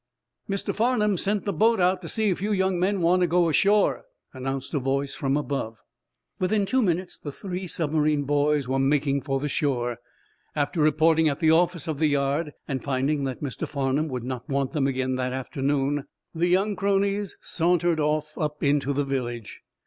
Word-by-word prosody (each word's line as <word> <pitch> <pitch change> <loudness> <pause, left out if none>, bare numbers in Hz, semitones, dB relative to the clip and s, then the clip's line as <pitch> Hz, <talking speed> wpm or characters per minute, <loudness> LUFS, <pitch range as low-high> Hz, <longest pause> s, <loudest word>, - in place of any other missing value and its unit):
"Mr. 195 0 -1
Farnum 215 -3 +2
sent 200 +3 -1
the 200 - -1
boat 225 +6 +3
out, 180 +1 +2
to 165 - -7
see 220 -2 +1
if 185 - -1
you 210 +2 -1
young 190 -2 +1
men 190 +1 +1
want 175 +2 +3
to 180 - +3
go 175 +1 +3
ashore," 200 +6 +3 0.3
announced 135 +2 -4
a 145 - +1
voice 135 +1 -1
from 135 0 0
above. 135 -7 -4 0.6
Within 200 +2 +1
two 260 +6 +2
minutes 180 -3 -1
the 145 - -6
three 185 +3 -5
submarine 155 -3 0
boys 145 -1 +1
were 135 +1 0
making 140 0 +2
for 135 -1 -1
the 145 - -2
shore. 125 -5 -1 0.6
After 145 +1 -1
reporting 155 +1 +4
at 140 - -3
the 160 -2 +4
office 170 -1 +2
of 155 -3 -3
the 155 - +3
yard, 145 +2 0
and 135 -2 -3
finding 140 +1 0
that 130 +2 -4
Mr. 130 -6 -4
Farnum 140 +1 0
would 125 -4 -4
not 125 -1 -5
want 140 -1 0
them 140 -4 +1
again 130 -1 -1
that 125 0 -2
afternoon, 135 +1 -1 0.3
the 170 +1 +1
young 195 +4 +2
cronies 200 +1 0
sauntered 170 -1 +1
off 155 0 0
up 150 -1 -2
into 140 -1 +2
the 145 +1 0
village. 120 -6 -4
150 Hz, 185 wpm, -25 LUFS, 135-180 Hz, 0.6 s, reporting